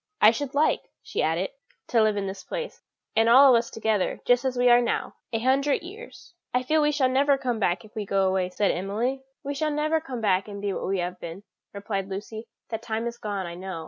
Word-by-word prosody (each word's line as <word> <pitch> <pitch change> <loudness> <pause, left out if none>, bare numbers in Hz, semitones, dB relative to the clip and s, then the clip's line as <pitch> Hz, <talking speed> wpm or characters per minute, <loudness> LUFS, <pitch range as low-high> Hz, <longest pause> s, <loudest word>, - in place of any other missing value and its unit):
"I 215 - +8
should 275 +3 -4
like," 300 +2 +2
she - - -2
added, - - 0 0.4
"to 230 - +4
live 215 -1 +2
in 200 - -1
this 190 0 -6
place, - - -6 0.3
and 225 +1 +4
all 265 +2 +8
of 235 - +6
us 230 - -5
together, 220 -3 -1
just 245 +1 +4
as 255 -1 -1
we 245 0 +3
are 240 0 +7
now, 240 - -1 0.2
a 225 - 0
hundred 270 +6 +1
years." 410 +2 -11 0.2
"I 250 - +2
feel 310 +4 +2
we 295 0 +3
shall 285 -3 +2
never 275 +2 +3
come 250 -4 -2
back 175 -2 0
if 215 - -18
we 215 - -2
go 195 -1 +1
away," 185 -1 0
said 200 +2 +1
Emily. 220 +9 -2 0.2
"We 285 - -3
shall 305 +2 -1
never 305 +2 0
come 265 -6 -6
back 195 -3 +1
and 200 -1 -7
be 200 -1 -2
what - - -4
we 195 +1 0
have 180 0 -3
been," 170 +4 -8 0.3
replied 200 -1 -4
Lucy; 215 +3 -6 0.2
"that 225 -1 -4
time 225 0 -3
is 235 0 -5
gone, 200 -3 -3
I 170 - -6
know. 185 -1 -6
225 Hz, 240 wpm, -26 LUFS, 195-270 Hz, 0.4 s, I